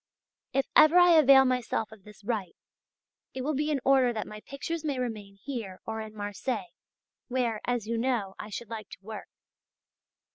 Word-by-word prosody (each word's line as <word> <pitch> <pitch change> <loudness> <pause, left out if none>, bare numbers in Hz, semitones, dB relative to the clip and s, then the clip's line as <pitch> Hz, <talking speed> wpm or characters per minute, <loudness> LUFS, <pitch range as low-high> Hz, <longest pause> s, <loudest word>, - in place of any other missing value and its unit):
If 270 0 +1
ever 310 +3 +7
I 355 0 +7
avail 275 -4 +7
myself 250 -4 -1
of 215 -3 -15
this 210 -1 -15
right, 205 -5 -3 0.8
it 260 - -3
will 305 +3 0
be 295 +2 0
in 295 -2 +1
order 265 -2 +5
that 220 -2 -3
my 215 - -9
pictures 285 +8 -5
may 290 -4 -1
remain 215 -5 -4
here 225 -9 -5
or 220 0 -4
in 215 0 -9
Marseilles, 205 -1 -4 0.5
where, 240 -4 -1
as 245 -3 -1
you 230 +1 -2
know, 230 -6 0
I 215 - -7
should 225 +2 -7
like 215 -3 -6
to - - -10
work. 220 +1 -8
235 Hz, 180 wpm, -28 LUFS, 215-270 Hz, 0.8 s, ever